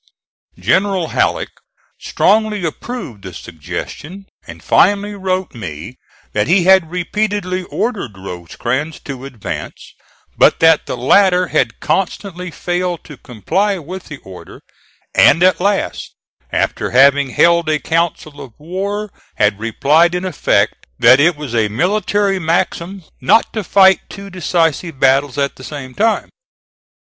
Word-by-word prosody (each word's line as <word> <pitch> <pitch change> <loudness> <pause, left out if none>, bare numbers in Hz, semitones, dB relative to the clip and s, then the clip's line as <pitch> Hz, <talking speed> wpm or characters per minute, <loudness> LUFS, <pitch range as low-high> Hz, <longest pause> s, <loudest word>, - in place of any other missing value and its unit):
General 185 - +1
Halleck - - 0 0.5
strongly 215 -3 +1
approved 160 - -6
the 95 -3 -9
suggestion, 145 - -8 0.2
and - - -11
finally 205 +2 +2
wrote 190 -1 -2
me 105 - -8 0.3
that 105 +2 0
he 180 +3 +3
had 190 -2 +4
repeatedly 185 +1 -2
ordered 200 - -3
Rosecrans 120 - -4
to 135 -2 -8
advance, 125 -7 -7 0.4
but - - +4
that 160 -1 +4
the - - -4
latter 180 +7 +3
had 130 -7 0
constantly 180 +2 -2
failed 175 0 -3
to 150 - -11
comply 175 - -2
with 180 +3 -8
the 145 - -9
order, 95 -1 -12 0.5
and 170 - +5
at 185 0 +4
last, 200 +1 -1 0.4
after - - -1
having 140 +2 +4
held 170 +4 +3
a 155 - +2
council 155 -1 -2
of 130 -5 -11
war, 195 +6 -4 0.2
had 105 -1 +1
replied 150 +10 +2
in 180 +1 -3
effect 185 - 0
that 125 +3 +6
it 170 +3 +4
was 145 -5 -7
a 110 -2 +2
military 195 - 0
maxim 170 +3 -2 0.2
"not 180 - +3
to 215 - -3
fight 190 +1 +5
two 200 0 -10
decisive 165 -3 -1
battles 135 +1 +2
at 140 -1 -1
the 130 - -12
same 130 -1 -8
time." 220 - 0
170 Hz, 135 wpm, -16 LUFS, 135-190 Hz, 0.5 s, that